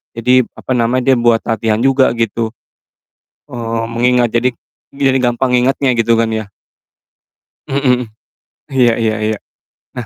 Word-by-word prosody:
jadi 125 +1 +3
apa - - -8
namanya 125 +3 +1
dia - - +3
buat 120 -1 +3
latihan 110 -1 0
juga 135 0 +3
gitu, 115 0 -1 1.0
eee, 115 -1 -3
mengingat 120 0 +2
jadi 120 +2 +2 0.4
jadi 135 -1 +1
gampang 125 +1 0
ngingatnya 130 +2 +1
gitu 115 0 +3
kan 115 -1 0
ya. 110 -2 -4 1.2
Mhm 140 +1 0
mhm. 125 -2 +2 0.6
Iya 125 -4 +2
iya 110 -1 0 0.2
iya, 110 - -3 0.6
nah, 120 - -4
120 Hz, 135 wpm, -15 LUFS, 115-130 Hz, 1.2 s, jadi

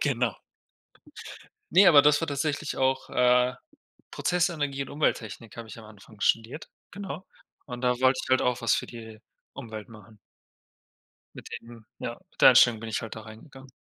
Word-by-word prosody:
genau. 125 -6 0 1.4
Ne, 195 +3 +7
aber 145 -4 +8
das 145 0 +4
war 165 - -2
tatsächlich 145 +1 -2
auch, 130 0 0
äh 125 0 +3 0.6
Prozessenergie 155 -6 -1
und 135 - -9
Umwelttechnik 115 -7 -3
habe 115 -1 -8
ich 110 - -10
am 115 - -12
Anfang 105 0 -16
studiert, 115 +9 0 0.2
genau. 190 -3 -7 0.4
Und 125 -2 -8
da 125 -1 +3
wollte 130 0 +3
ich - - -11
halt 130 0 +3
auch 125 -1 0
was 115 -4 +2
für - - -2
die 110 -2 -11 0.3
Umwelt 110 -3 -9
machen. 110 -1 -15 1.2
Mit - - -10
dem 115 -1 -14
ja, 120 - -5 0.2
mit - - -17
der - - +9
Einstellung 120 -3 +5
bin 115 - -7
ich 110 - -3
halt 115 - -7
da 110 - -8
reingegangen. 130 +5 -14
125 Hz, 170 wpm, -27 LUFS, 115-140 Hz, 1.4 s, der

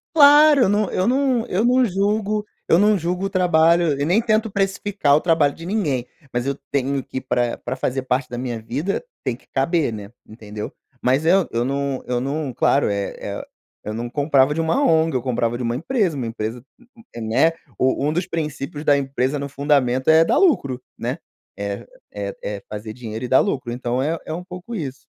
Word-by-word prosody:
Claro, 295 -2 +7
eu - - +4
não 205 -1 +1
eu 185 - 0
não 255 -2 +1
eu 195 +5 0
não 250 +1 +4
julgo 210 +1 0 0.2
eu 165 - +5
não 210 -1 +4
julgo 180 +3 -2
o - - -3
trabalho 170 -4 +3
e - - +1
nem 180 +8 +3
tento 220 -1 +1
precificar 195 -6 +1
o - - +2
trabalho 160 -5 +2
de 165 - -10
ninguém. 155 - -1 0.3
Mas, 120 +1 -1
eu 140 - 0 0.2
tenho 140 0 0
que 130 - -6
ir - - -4
pra 120 -2 0
pra 125 +2 -5
fazer 130 0 -2
parte 130 0 -1
da 120 - -6
minha 120 -2 -4
vida 145 - -3 0.2
tem 120 -2 -1
que - - -27
caber, 140 0 +1
né, 105 -2 -7 0.2
entendeu? 105 -1 -8 0.3
Mas, 130 +5 +2
eu 185 +1 +4 0.2
não 140 0 -2
eu 125 -1 -1
não, 140 +1 -3
claro 135 +1 +2
eh 100 -1 -2
eh - - -5 0.4
eu 105 - -4
não 120 +2 -4
comprava 140 0 +3
de 160 - -1
uma 165 - +1
ONG 160 - +3
eu 125 - -1
comprava 120 -2 -1
de 125 - -4
uma 115 0 -1
empresa 195 - 0
uma 125 -4 -3
empresa 115 +1 -4 0.6
Né, 115 +8 +2 0.3
u 130 +1 +1
um 150 - +1
dos 175 +2 -1
princípios 150 -2 -4
da 145 -2 +5
empresa, 135 +1 -1
no 140 0 -4
fundamento 135 -3 +1
é 160 +1 +7
dar - - +2
lucro, 140 - +2 0.2
né, - - -3 0.4
é 100 0 -5 0.3
é - - -5
é - - -5
fazer 110 +1 -6
dinheiro 115 0 -6
e - - -3
dá 130 - +5
lucro, 120 -3 -1
então, 125 +1 -2
é 160 +4 -1
é - - -5
um 175 - -5
pouco 180 +6 -8
isso. 145 -9 -4
145 Hz, 205 wpm, -21 LUFS, 125-185 Hz, 0.6 s, Claro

